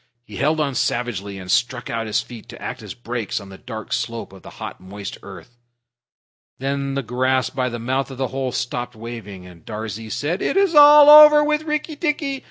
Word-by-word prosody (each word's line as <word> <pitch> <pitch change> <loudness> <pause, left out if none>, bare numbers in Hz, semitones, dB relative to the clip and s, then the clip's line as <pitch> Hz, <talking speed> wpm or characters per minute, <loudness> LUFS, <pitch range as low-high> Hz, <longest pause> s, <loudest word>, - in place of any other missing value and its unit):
He 105 -3 -11
held 155 +3 +1
on 145 -3 0
savagely, 105 -6 -2
and 95 -1 -6
stuck 125 +3 0
out 115 -1 -3
his 105 - 0
feet 120 -3 -12
to - - -11
act - - -6
as - - -9
brakes 120 -3 -4
on 100 -1 -12
the 95 - -11
dark 110 -3 -7
slope 115 -4 -4
of 95 - -14
the - - -12
hot, - - -8
moist 100 +1 -8
earth. 120 0 -13 1.0
Then 140 +1 -3
the 140 - -2
grass 130 +2 0
by 130 -1 -1
the 120 - -5
mouth 130 +4 -2
of 135 - -9
the 130 -1 -2
hole 130 -1 -3
stopped 125 -1 -4
waving, 110 -5 -9
and 90 -2 -15
Darzee 110 0 -6
said, 145 - -2
"It - - -1
is 390 -3 +3
all 295 0 +8
over 300 0 +9
with 300 +1 0
Rikki 300 0 -3
tikki! 290 -3 -2
125 Hz, 205 wpm, -21 LUFS, 110-150 Hz, 1.0 s, over